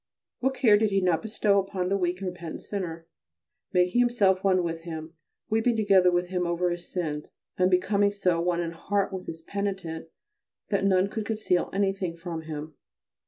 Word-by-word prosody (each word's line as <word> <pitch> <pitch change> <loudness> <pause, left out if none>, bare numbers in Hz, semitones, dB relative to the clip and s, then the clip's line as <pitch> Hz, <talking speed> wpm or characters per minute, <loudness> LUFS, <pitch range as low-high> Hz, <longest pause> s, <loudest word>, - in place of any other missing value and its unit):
What 265 +1 0
care 230 -5 +5
did 215 0 +2
he 195 -1 +2
not 180 -4 +2
bestow 210 -2 +2
upon 190 -2 -2
the 195 - +2
weak 180 -1 -1
and 190 - -1
repentant 175 -2 -7
sinner, 170 -5 -5 0.7
making 180 +5 +3
himself 205 -6 +3
one 185 -2 +3
with 165 -1 -3
him, 160 -1 -7 0.3
weeping 225 +2 +2
together 195 -4 +5
with 175 0 0
him 180 -1 -1
over 175 +1 0
his 175 0 -5
sins, 150 -5 -3 0.3
and 185 0 +3
becoming 200 +2 +3
so 180 -4 +1
one 175 0 +1
in 165 -1 -3
heart 195 +4 -1
with 185 -1 -6
his 165 0 -7
penitent 190 -5 -4 0.6
that 200 -2 +1
none 190 -1 +4
could 215 0 -4
conceal 215 -5 0
anything 195 -3 -1
from 165 -1 -5
him. 155 -1 -7
185 Hz, 180 wpm, -27 LUFS, 170-200 Hz, 0.7 s, care